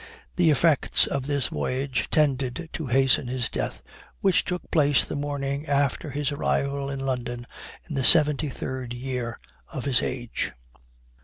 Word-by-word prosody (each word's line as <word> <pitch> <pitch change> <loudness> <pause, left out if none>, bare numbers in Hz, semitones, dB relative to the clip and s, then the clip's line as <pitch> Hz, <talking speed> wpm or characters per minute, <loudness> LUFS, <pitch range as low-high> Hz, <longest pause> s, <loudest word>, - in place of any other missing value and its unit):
The 175 -3 +3
effects 155 0 +4
of 140 -1 -3
this 140 -3 0
voyage 130 - -2
tended 140 +1 0
to 160 - -4
hasten 130 0 +3
his 125 -1 -2
death, - - -4 0.4
which 190 -2 +3
took 180 0 -5
place 145 -4 +3
the - - -5
morning 145 0 -3
after 140 +1 0
his 145 +1 -2
arrival 140 -1 -1
in 135 -1 -4
London, 120 -2 -3 0.4
in - - -6
the 135 - 0
73rd 130 -4 +3
year 125 -2 -4 0.3
of 135 -5 -5
his 130 -4 +3
age." 120 -2 -3
140 Hz, 145 wpm, -25 LUFS, 130-145 Hz, 0.4 s, effects